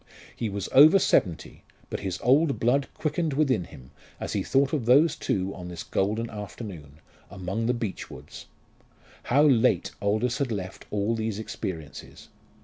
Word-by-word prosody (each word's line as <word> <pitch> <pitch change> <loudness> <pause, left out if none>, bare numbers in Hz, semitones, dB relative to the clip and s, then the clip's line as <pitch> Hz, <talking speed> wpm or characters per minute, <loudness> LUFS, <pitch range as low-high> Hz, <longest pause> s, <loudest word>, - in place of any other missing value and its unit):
He 115 - -3
was 100 -1 -4
over 155 +8 +8
seventy, 90 - 0 0.3
but - - -3
his 95 -2 -4
old 140 +3 +3
blood 135 +4 +2
quickened 155 0 -1
within 135 - +1
him 65 -4 -14 0.3
as - - -4
he - - 0
thought 135 +2 +1
of 130 -7 -1
those 145 +7 +5
two 95 0 -2
on 90 -1 -8
this 85 -2 -7
golden 110 +7 -1
afternoon, 100 - -8 0.4
among 100 +4 -3
the 125 - +2
beech 110 -5 -5
woods. - - -11 0.8
How 140 +4 +4
late 130 -4 +3
Aldous 110 +6 0
had 135 -4 -1
left 95 -3 -5
all 105 +2 0
these 110 -2 -2
experiences! 90 -8 -7
110 Hz, 155 wpm, -26 LUFS, 95-135 Hz, 0.8 s, over